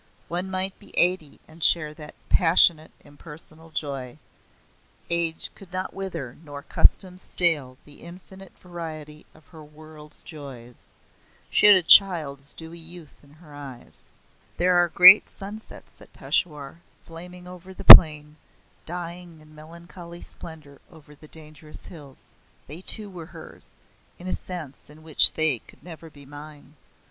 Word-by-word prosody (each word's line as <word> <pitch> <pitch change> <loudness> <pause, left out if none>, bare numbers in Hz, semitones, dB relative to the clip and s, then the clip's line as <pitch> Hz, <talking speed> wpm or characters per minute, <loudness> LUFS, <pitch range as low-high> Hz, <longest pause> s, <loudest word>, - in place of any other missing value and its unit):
One 180 +3 -6
might 190 0 -3
be - - -19
eighty 175 -4 -1
and 160 +1 -10
share 155 -3 +2
that 150 0 -14
passionate 165 -2 +1
impersonal 155 +2 -17
joy. 140 -5 -8 0.9
Age 170 -1 -2
could 190 -3 -18
not 185 +1 -7
wither 180 -11 -8
nor 145 -2 -12
custom 185 +3 0
stale 150 -10 0
the 145 - -20
infinite 190 +2 -15
variety 155 -4 -11
of 155 - -23
her 160 -3 -15
world's 150 0 -17
joys. 135 -6 -14 0.7
She - - +2
had 205 - +7
a 185 - 0
child's 155 -7 +3
dewy 165 +1 -13
youth 165 -1 -15
in 145 0 -23
her 155 -1 -19
eyes. 135 -4 -14 0.5
There 180 +1 0
are 175 0 +2
great 180 +4 +6
sunsets 210 +2 -13
at - - -19
Peshawar, 150 -1 -5 0.2
flaming 180 +2 -13
over 180 +1 -14
the 190 - -12
plain, 150 -1 +7 0.5
dying 175 -1 -9
in 155 0 -21
melancholy 170 +2 -14
splendour 150 -4 -10
over 155 -3 -19
the 155 +1 -18
dangerous 155 0 -7
hills. 145 -5 -16 0.4
They 155 +5 -6
too 210 +2 +2
were 175 -5 -12
hers, - - -15 0.5
in 175 - -15
a 185 - -4
sense 160 -8 -5
in 155 +1 -18
which 155 -2 +3
they 155 -6 +7
could - - -19
never 165 -2 -13
be 145 -2 -18
mine. 145 0 -15
160 Hz, 145 wpm, -22 LUFS, 150-175 Hz, 0.9 s, had